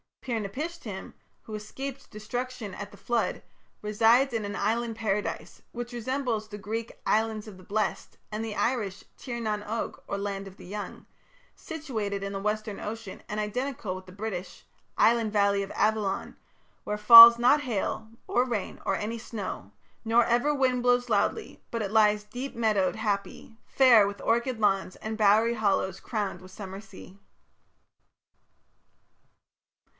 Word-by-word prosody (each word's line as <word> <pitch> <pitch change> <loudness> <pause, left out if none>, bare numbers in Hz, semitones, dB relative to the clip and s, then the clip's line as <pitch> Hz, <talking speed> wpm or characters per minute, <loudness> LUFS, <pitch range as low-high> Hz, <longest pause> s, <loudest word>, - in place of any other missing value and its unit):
Pir 235 -3 -2
napishtim, 225 - -6 0.3
who 220 - -10
escaped 265 +6 -7
destruction 225 0 -5
at 205 0 -7
the - - -14
Flood, 240 -1 -1 0.4
resides 225 +5 +4
in 220 -2 -1
an 205 0 -4
Island 225 +3 -1
Paradise, 210 -2 -3
which 240 0 -6
resembles 240 -2 -2
the 205 -1 -8
Greek 220 +3 -5
"Islands 220 0 0
of 200 -3 -10
the 185 - -14
Blessed", 215 +3 -2
and 215 +1 -3
the 215 -2 -5
Irish 210 -6 -1
"Tir 240 -3 -5
nan 210 -2 -2
og" 225 +2 -4
or 200 - -3
"Land 200 -1 -4
of 190 - -13
the - - -12
Young", 205 +3 -7 0.5
situated 220 -11 -4
in 200 0 -4
the 195 - -3
western 210 0 -2
ocean, 220 -2 -7
and 210 - -3
identical 215 -2 -3
with 185 0 -9
the - - -11
British 195 -2 -6 0.3
island 225 -2 +3
valley 200 -1 +3
of 195 - -7
Avilion, 210 -2 0 0.5
Where 210 - -3
falls 230 +2 +11
not 255 +5 +5
hail, 220 -3 -3 0.2
or 245 +1 +2
rain, 230 -6 -4
or 195 - +1
any 220 +4 -3
snow, 200 - -6 0.3
Nor 230 +1 +4
ever 245 +5 +2
wind 260 -3 +1
blows 245 0 +2
loudly, 220 - -1
but 230 - -3
it 200 - -4
lies 210 -1 +4
Deep 245 +6 -7
meadow'd, 215 -5 +1
happy, 215 0 -3
fair 240 -6 +6
with 200 0 -6
orchard 235 +1 0
lawns 195 -3 +1
And 220 0 -5
bowery 220 +2 +4
hollows 195 -3 0
crowned 205 -5 -3
with 185 0 -13
summer 195 0 -8
sea. 200 -2 -14
215 Hz, 155 wpm, -28 LUFS, 200-235 Hz, 0.5 s, falls